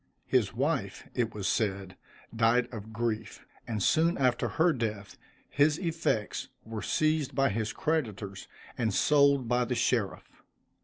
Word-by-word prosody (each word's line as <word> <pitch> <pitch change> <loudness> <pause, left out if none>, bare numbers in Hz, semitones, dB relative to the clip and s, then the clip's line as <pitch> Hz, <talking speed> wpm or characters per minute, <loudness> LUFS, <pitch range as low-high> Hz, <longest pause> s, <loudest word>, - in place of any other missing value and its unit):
His - - +2
wife, - - -2
it 120 -2 0
was 105 -3 -4
said, 95 -4 -1 0.4
died 115 +2 +3
of 110 -1 -7
grief, 110 -1 -3 0.2
and 110 -4 -2
soon 165 +2 +3
after 125 -3 +2
her 165 +1 +2
death, 110 -6 -4 0.3
his 145 +2 +3
effects 165 - -1 0.2
were 110 -1 -5
seized 155 +3 0
by 135 0 +3
his 110 +1 -2
creditors, 105 -11 -2 0.3
and 110 -5 0
sold 140 -3 +4
by 125 +1 +2
the 125 +1 -2
sheriff. 115 -5 0
120 Hz, 140 wpm, -29 LUFS, 110-140 Hz, 0.4 s, sold